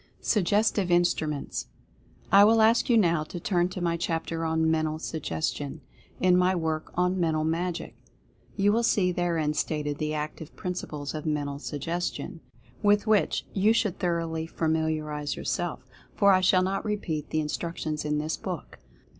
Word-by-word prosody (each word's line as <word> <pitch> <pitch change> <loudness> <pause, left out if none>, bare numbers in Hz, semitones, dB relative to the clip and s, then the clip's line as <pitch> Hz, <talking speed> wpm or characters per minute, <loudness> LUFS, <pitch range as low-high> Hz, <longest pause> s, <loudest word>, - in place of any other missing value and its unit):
SUGGESTIVE 205 -1 +2
INSTRUMENTS. 170 -4 0 0.6
I 200 +1 +8
will 220 +1 +5
ask 230 +3 +4
you 235 - +5
now 170 -6 +3
to 175 - -7
turn 175 0 +1
to 185 - -6
my 170 -1 0
chapter 165 0 -2
on 160 0 +2
"Men 160 -1 +1
tal 155 0 -2
Suggestion," 155 -1 -3 0.4
in 180 -1 +4
my 180 +1 +3
work 160 -2 -2
on 180 +1 +1
"Mental 160 -2 +1
Magic." 170 +2 -2 0.6
You 205 0 +3
will 230 - +2
see 195 -5 +2
therein 170 -4 0
stated 150 -1 -2
the 155 0 -1
active 150 +1 -5
principles 155 -5 -5
of 155 0 -5
Mental 145 -2 -2
Suggestion, 165 +5 -4 0.4
with 205 0 +3
which 210 -7 +2
you 205 +3 +4
should 210 -5 0
thoroughly 165 -2 -1
familiarize 155 -2 -1
yourself, - - -3 0.3
for 200 -1 +5
I 185 -1 +4
shall 185 0 +4
not 195 +1 -1
repeat 185 -8 -3
the - - -2
instruc 165 +3 -3
tions 155 -1 -3
in 150 0 0
this 155 +2 -2
book. - - -6
165 Hz, 160 wpm, -27 LUFS, 155-185 Hz, 0.6 s, I